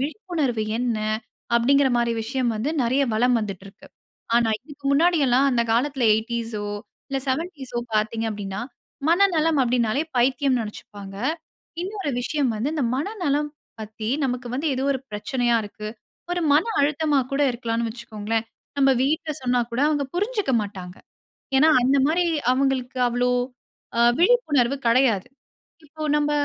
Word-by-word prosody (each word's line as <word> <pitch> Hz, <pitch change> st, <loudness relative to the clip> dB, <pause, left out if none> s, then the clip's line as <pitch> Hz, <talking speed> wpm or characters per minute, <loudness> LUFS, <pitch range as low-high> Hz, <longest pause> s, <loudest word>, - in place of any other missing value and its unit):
விழிப்புணர்வு 300 Hz, -, -2 dB, 0.2 s
என்ன? 240 Hz, -3 st, 0 dB, 0.6 s
அப்படிங்கிற 270 Hz, +4 st, +4 dB
மாதிரி 235 Hz, -1 st, +1 dB
விஷயம் 245 Hz, +1 st, -1 dB
வந்து 235 Hz, +8 st, -1 dB
நிறைய 255 Hz, +4 st, +2 dB
வலம் 245 Hz, +3 st, +3 dB
வந்துட்டு 195 Hz, -3 st, -5 dB
இருக்கு. 195 Hz, -, -15 dB, 0.5 s
ஆனா 235 Hz, -1 st, +4 dB
இதற்கு 285 Hz, +1 st, -15 dB
முன்னாடி 340 Hz, +5 st, +4 dB
எல்லாம் 255 Hz, +2 st, +4 dB
அந்த 235 Hz, -2 st, +2 dB
காலத்தில 265 Hz, +1 st, +1 dB
80ஸ் 230 Hz, +1 st, -3 dB
ஓ -, -, -4 dB, 0.4 s
இல்ல 275 Hz, -, -1 dB
70ஸ் 275 Hz, -2 st, -3 dB, 0.2 s
பார்த்தீங்க 220 Hz, +1 st, 0 dB
அப்படின்னா, 200 Hz, -2 st, -5 dB, 0.5 s
மனநலம் 330 Hz, -4 st, +3 dB
அப்படின்னாலே 245 Hz, +1 st, +1 dB
பைத்தியம்ன்னு 255 Hz, 0 st, +2 dB
நினைச்சுப்பாங்க. 205 Hz, -2 st, -9 dB, 0.7 s
இன்னொரு 390 Hz, -4 st, -3 dB
விஷயம் 275 Hz, 0 st, 0 dB
வந்து 225 Hz, +6 st, -1 dB
இந்த 295 Hz, -5 st, 0 dB
மனநலம் 300 Hz, -4 st, -1 dB, 0.3 s
பத்தி 215 Hz, 0 st, -6 dB, 0.2 s
நமக்கு 250 Hz, -1 st, -2 dB
வந்து 285 Hz, +5 st, -2 dB
ஏதோ 260 Hz, -, -2 dB
ஒரு 265 Hz, -, -3 dB
பிரச்சனையா 240 Hz, +3 st, 0 dB
இருக்கு. 210 Hz, +1 st, -7 dB, 0.4 s
ஒரு 355 Hz, -, -1 dB
மன 300 Hz, +3 st, +5 dB, 0.2 s
அழுத்தமா 295 Hz, 0 st, +2 dB
கூட 275 Hz, -, 0 dB
இருக்கலாம்ன்னு 235 Hz, -1 st, -2 dB
வச்சுக்கோங்களேன். 225 Hz, -1 st, -3 dB, 0.3 s
நம்ம 270 Hz, -1 st, +5 dB
வீட்ல 310 Hz, +3 st, 0 dB
சொன்னா 250 Hz, -1 st, +1 dB
கூட 235 Hz, +2 st, -2 dB
அவங்க 290 Hz, -2 st, 0 dB
புரிஞ்சுக்க 415 Hz, -, -1 dB
மாட்டாங்க. 190 Hz, -3 st, -7 dB, 0.6 s
ஏன்னா, 305 Hz, +4 st, +6 dB
அந்த 265 Hz, +3 st, +3 dB
மாரி 345 Hz, +3 st, +2 dB, 0.3 s
அவங்களுக்கு 260 Hz, -1 st, 0 dB
அவ்வளவு 245 Hz, +1 st, +1 dB, 0.7 s
அ -, -, +5 dB, 0.2 s
விழிப்புணர்வு 310 Hz, -, +3 dB
கிடையாது. 230 Hz, -4 st, +3 dB, 0.6 s
இப்போ 310 Hz, +1 st, -8 dB
நம்ம 295 Hz, 0 st, +1 dB
255 Hz, 140 wpm, -23 LUFS, 230-295 Hz, 0.7 s, ஏன்னா